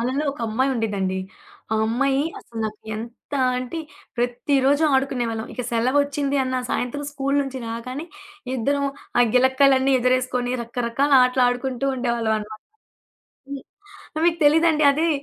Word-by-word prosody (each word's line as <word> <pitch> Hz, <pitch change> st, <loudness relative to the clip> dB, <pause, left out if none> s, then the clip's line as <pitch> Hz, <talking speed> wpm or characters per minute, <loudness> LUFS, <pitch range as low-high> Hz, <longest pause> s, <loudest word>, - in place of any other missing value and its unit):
అళ్ళలో 260 Hz, +5 st, -1 dB
ఒక 285 Hz, -, -12 dB
అమ్మాయి 260 Hz, +5 st, +1 dB
ఉండిదండి. 200 Hz, -5 st, -1 dB, 0.5 s
ఆ -, -, +2 dB
అమ్మాయి 270 Hz, +4 st, +1 dB, 0.2 s
అసలు 230 Hz, -, -11 dB
నాకు 215 Hz, 0 st, -8 dB, 0.2 s
ఎంత 235 Hz, +5 st, -10 dB, 0.3 s
అంటే, 255 Hz, +6 st, -5 dB, 0.4 s
ప్రతిరోజు 265 Hz, +4 st, +1 dB
ఆడుకునేవాళ్ళం. 245 Hz, -4 st, -1 dB
ఇక 250 Hz, -, -3 dB
సెలవు 250 Hz, +5 st, +2 dB
వచ్చిందన్న 275 Hz, -2 st, -1 dB
సాయంత్రం 285 Hz, +4 st, -2 dB
స్కూలు 275 Hz, 0 st, -1 dB
నుంచి 265 Hz, -1 st, -6 dB
రాగానే, 255 Hz, +7 st, -5 dB, 0.5 s
ఇద్దరం 280 Hz, +4 st, 0 dB, 0.3 s
ఆ -, -, +8 dB
గిలక్కాలన్ని 265 Hz, +1 st, +4 dB
ఎదురేసుకొని, 250 Hz, 0 st, +1 dB
రకరకాల 235 Hz, +4 st, -1 dB
ఆటలాడుకుంటూ 250 Hz, +1 st, 0 dB
ఉండేవాళ్ళవనమాట. 220 Hz, -3 st, -2 dB, 0.9 s
హ్మ్. 280 Hz, -2 st, -6 dB, 0.6 s
మీకు 340 Hz, -1 st, +2 dB
తెలీదండి. 310 Hz, 0 st, +4 dB
అదే 320 Hz, +4 st, +1 dB
255 Hz, 120 wpm, -23 LUFS, 235-275 Hz, 0.9 s, ఆ